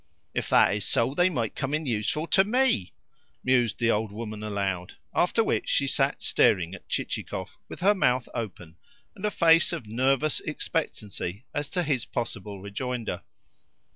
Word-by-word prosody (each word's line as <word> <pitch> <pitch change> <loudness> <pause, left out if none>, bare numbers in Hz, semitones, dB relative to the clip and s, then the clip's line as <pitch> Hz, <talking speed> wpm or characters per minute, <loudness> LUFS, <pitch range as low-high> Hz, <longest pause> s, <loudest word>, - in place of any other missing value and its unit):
"If - - -2
that - - +5
is 105 0 -1
so, 115 +3 +2
they 175 +4 +4
might 120 - -2
come 140 +1 -1
in 155 0 -2
useful 125 +6 -1
to 190 +3 +4
ME," 235 - +2 0.5
mused 125 -3 +2
the 120 -1 +2
old 105 -1 0
woman 110 0 -6
aloud; 100 -4 -2 0.2
after - - +3
which - - -1
she - - +3
sat - - 0
staring 90 -3 +3
at 95 - -11
Chichikov - - -3
with - - -9
her 200 +3 +5
mouth 125 -10 +1
open 90 -8 -6 0.4
and 205 0 -5
a - - +2
face 165 -3 +5
of 165 -9 -4
nervous 135 +7 +1
expectancy 110 - -3
as 145 0 -2
to 180 +1 0
his 140 -7 0
possible 105 -4 -4
rejoinder. 115 +4 -4
120 Hz, 165 wpm, -27 LUFS, 105-155 Hz, 0.5 s, that